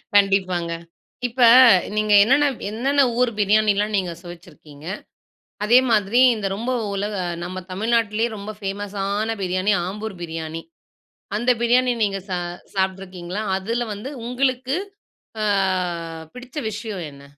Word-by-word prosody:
கண்டிப்பாங்க. 185 Hz, -4 st, +2 dB, 0.6 s
இப்ப 245 Hz, +2 st, -5 dB, 0.5 s
நீங்க 215 Hz, 0 st, +2 dB
என்னென்ன 270 Hz, +7 st, +4 dB, 0.3 s
என்னென்ன 270 Hz, +6 st, +1 dB, 0.2 s
ஊர் 250 Hz, -1 st, +3 dB
பிரியாணிலாம் 210 Hz, 0 st, +2 dB
நீங்க 185 Hz, -3 st, -1 dB
சுவச்சிருக்கீங்க. 165 Hz, -4 st, -13 dB, 0.8 s
அதே 235 Hz, +4 st, +6 dB
மாதிரி 215 Hz, +2 st, +3 dB, 0.2 s
இந்த 210 Hz, -2 st, -3 dB
ரொம்ப 235 Hz, +5 st, -3 dB, 0.2 s
உலக 205 Hz, +2 st, -2 dB, 0.3 s
நம்ம 185 Hz, +1 st, -5 dB
தமிழ்நாட்லேயே 225 Hz, +2 st, +1 dB
ரொம்ப 205 Hz, +1 st, -6 dB
ஃபேமஸான 205 Hz, +2 st, -3 dB
பிரியாணி 185 Hz, +2 st, +1 dB
ஆம்பூர் 210 Hz, +1 st, -5 dB
பிரியாணி. 160 Hz, -1 st, -5 dB, 0.8 s
அந்த 240 Hz, +3 st, +2 dB
பிரியாணி 245 Hz, +1 st, +3 dB
நீங்க 200 Hz, -1 st, 0 dB
சா 180 Hz, -1 st, -1 dB, 0.4 s
சாப்ட்டுருக்கீங்களா? 190 Hz, 0 st, -3 dB, 0.2 s
அதில 230 Hz, +5 st, -2 dB
வந்து 205 Hz, +6 st, -7 dB, 0.2 s
உங்களுக்கு 255 Hz, +2 st, 0 dB, 0.7 s
அ -, -, +1 dB, 0.9 s
பிடிச்ச 250 Hz, +3 st, -12 dB
விஷயம் 210 Hz, -4 st, -5 dB
என்ன? 140 Hz, 0 st, -15 dB
205 Hz, 115 wpm, -22 LUFS, 190-230 Hz, 0.9 s, அதே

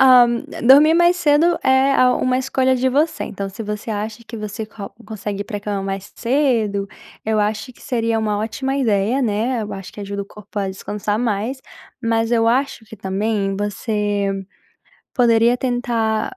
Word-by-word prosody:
Hã, 255 Hz, -2 st, +8 dB, 0.4 s
dormir 290 Hz, +6 st, +7 dB
mais 345 Hz, +1 st, +4 dB
cedo 335 Hz, +1 st, +3 dB
é 265 Hz, +1 st, +4 dB
a 250 Hz, -1 st, +4 dB
uma 255 Hz, 0 st, +1 dB
escolha 260 Hz, 0 st, +1 dB
de 255 Hz, +1 st, +1 dB
você. 295 Hz, +5 st, +1 dB
Então 195 Hz, 0 st, -5 dB
se 210 Hz, +4 st, -7 dB
você 210 Hz, +2 st, -5 dB
acha 215 Hz, +2 st, -4 dB
que 230 Hz, -, -8 dB
você 215 Hz, +1 st, -5 dB
co 210 Hz, -2 st, -9 dB
consegue 205 Hz, -2 st, -5 dB
ir -, -, -2 dB
pra 205 Hz, -, -5 dB
cama 205 Hz, -1 st, -3 dB
mais 195 Hz, 0 st, -5 dB
cedo, 230 Hz, -6 st, +1 dB, 0.4 s
eu 220 Hz, -1 st, +1 dB
acho 215 Hz, +4 st, -2 dB
que -, -, -20 dB
seria 230 Hz, -2 st, 0 dB
uma 210 Hz, -2 st, 0 dB
ótima 265 Hz, +5 st, -2 dB
ideia, 225 Hz, -1 st, +1 dB
né. 230 Hz, +1 st, 0 dB
Eu 210 Hz, -, -6 dB
acho 195 Hz, -1 st, -8 dB
que -, -, -9 dB
ajuda 200 Hz, 0 st, -4 dB
o -, -, -9 dB
corpo 210 Hz, 0 st, -15 dB
a 195 Hz, -1 st, -1 dB
descansar 205 Hz, +2 st, -3 dB
mais, 230 Hz, +2 st, -1 dB, 0.4 s
mas 230 Hz, 0 st, +1 dB
eu 230 Hz, -1 st, +3 dB
acho 250 Hz, 0 st, +1 dB
que 220 Hz, 0 st, -12 dB
também 195 Hz, 0 st, -1 dB
você 205 Hz, -1 st, -1 dB, 0.8 s
poderia 235 Hz, -1 st, +4 dB
tentar 240 Hz, -, -1 dB
225 Hz, 175 wpm, -20 LUFS, 205-255 Hz, 0.8 s, Hã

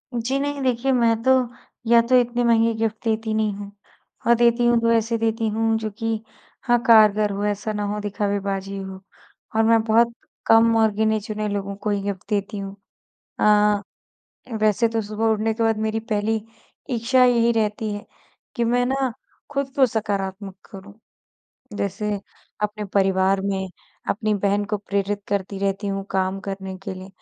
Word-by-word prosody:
जी 240 Hz, +4 st, -1 dB
नहीं, 285 Hz, 0 st, -2 dB
देखिए 255 Hz, +1 st, +1 dB
मैं 235 Hz, -3 st, +3 dB
तो 260 Hz, -, +4 dB, 0.6 s
या 235 Hz, 0 st, +6 dB
तो 240 Hz, +2 st, +2 dB
इतने 245 Hz, 0 st, 0 dB
महँगे 230 Hz, -1 st, +3 dB
गिफ्ट 220 Hz, -1 st, -2 dB
देती 220 Hz, 0 st, 0 dB
नहीं 215 Hz, -1 st, +1 dB
हूँ, 200 Hz, 0 st, -8 dB, 0.6 s
और 235 Hz, -, +6 dB
देती 235 Hz, +1 st, +3 dB
हूँ, 240 Hz, 0 st, +4 dB
तो 230 Hz, 0 st, +2 dB
ऐसे 230 Hz, 0 st, +1 dB
देती 225 Hz, 0 st, 0 dB
हूँ 225 Hz, +1 st, +1 dB
जो 220 Hz, -1 st, -3 dB
कि 225 Hz, -1 st, -1 dB, 0.4 s
हाँ, 240 Hz, -1 st, +3 dB
कारगर 215 Hz, -2 st, +6 dB
हो 200 Hz, +1 st, -3 dB
ऐसा 210 Hz, +1 st, -2 dB
ना 210 Hz, 0 st, -2 dB
हो 210 Hz, -, -3 dB
दिखावेबाजी 200 Hz, -1 st, -2 dB
हो। 190 Hz, -1 st, -7 dB, 0.6 s
और 225 Hz, -, +4 dB
मैं 225 Hz, 0 st, +4 dB
बहुत 230 Hz, +1 st, +3 dB, 0.3 s
कम 225 Hz, 0 st, +5 dB
और 220 Hz, -1 st, +4 dB
गिने-चुने 215 Hz, 0 st, -1 dB
लोगों 200 Hz, -1 st, -3 dB
को 215 Hz, -, 0 dB
ही 200 Hz, 0 st, -1 dB, 0.2 s
देती 205 Hz, 0 st, -1 dB
हूँ। 195 Hz, 0 st, -6 dB, 0.6 s
अ, 210 Hz, -1 st, +4 dB, 0.8 s
वैसे 215 Hz, +2 st, +3 dB
तो 225 Hz, 0 st, -1 dB
सुबह 215 Hz, +2 st, -4 dB
उठने 220 Hz, +1 st, 0 dB
के 230 Hz, -, -2 dB
बाद 225 Hz, -1 st, +2 dB
मेरी 220 Hz, +1 st, -1 dB
पहली 220 Hz, 0 st, -1 dB, 0.5 s
इच्छा 245 Hz, +2 st, +3 dB
यही 235 Hz, -1 st, +4 dB
रहती 215 Hz, -1 st, -1 dB
है, 205 Hz, -, -7 dB, 0.5 s
कि 235 Hz, -, +1 dB
मैं 245 Hz, +1 st, +2 dB
ना 265 Hz, -2 st, 0 dB, 0.4 s
खुद 275 Hz, -2 st, -2 dB
को 265 Hz, -2 st, +6 dB
सकारात्मक 200 Hz, -3 st, -3 dB
करूँ, 195 Hz, 0 st, -11 dB, 0.8 s
जैसे 200 Hz, +1 st, -2 dB, 0.4 s
अपने 210 Hz, 0 st, -2 dB
परिवार 190 Hz, 0 st, +3 dB
में 190 Hz, -1 st, -2 dB, 0.4 s
अपनी 215 Hz, 0 st, 0 dB
बहन 200 Hz, +1 st, +1 dB
को 210 Hz, +1 st, -2 dB
प्रेरित 200 Hz, 0 st, -2 dB
करती 195 Hz, -1 st, -2 dB
रहती 195 Hz, +1 st, -1 dB
हूँ, 195 Hz, 0 st, -2 dB
काम 190 Hz, 0 st, 0 dB
करने 190 Hz, -1 st, -6 dB
के 190 Hz, -, -5 dB
लिए, 185 Hz, +1 st, -10 dB
215 Hz, 170 wpm, -23 LUFS, 200-230 Hz, 0.8 s, या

